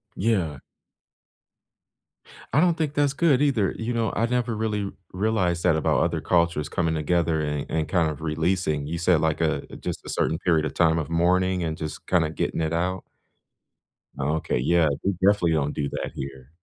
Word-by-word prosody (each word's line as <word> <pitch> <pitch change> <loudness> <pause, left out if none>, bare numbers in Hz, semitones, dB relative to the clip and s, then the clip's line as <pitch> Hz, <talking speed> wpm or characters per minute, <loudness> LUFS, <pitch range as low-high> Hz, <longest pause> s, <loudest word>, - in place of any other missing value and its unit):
Yeah. 90 -10 0 1.9
I 140 - +3
don't 175 -1 +4
think 155 -3 -1
that's 145 -1 +2
good 145 -3 +3
either. 120 -9 +2
You 115 +2 -3
know, 115 -3 0
I 115 - +2
never 120 -1 -1
really 105 -2 -2 0.2
realized 90 -4 0
that 90 -3 +4
about 80 - +1
other - - 0
cultures 85 -4 +1
coming 80 -2 0
together 80 +1 +1
and 75 -1 -2
and 80 -1 -1
kind 85 -4 +2
of 75 0 -6
releasing. 80 -2 0
You 85 +2 -3
said, 85 -2 +3
like, 80 -1 0
a 80 -3 +1 0.2
just - - -4
a - - -7
certain 80 - 0
period 80 -4 +2
of - - -4
time 80 -1 +3
of 80 0 -3
mourning 90 +2 +2
and 80 -1 -3
just 75 -1 -6
kinda 80 -4 +2
getting 80 - -2
it 80 +1 -1
out. 90 +2 -1 1.2
Oh, 75 +3 0
okay. 80 - -1
Yeah. 85 +4 +3 0.2
We 100 - +1
definitely 95 -2 +2
don't 75 -2 0
do 70 -2 -2
that - - -4
here. 65 +1 -8
85 Hz, 185 wpm, -25 LUFS, 80-100 Hz, 1.9 s, don't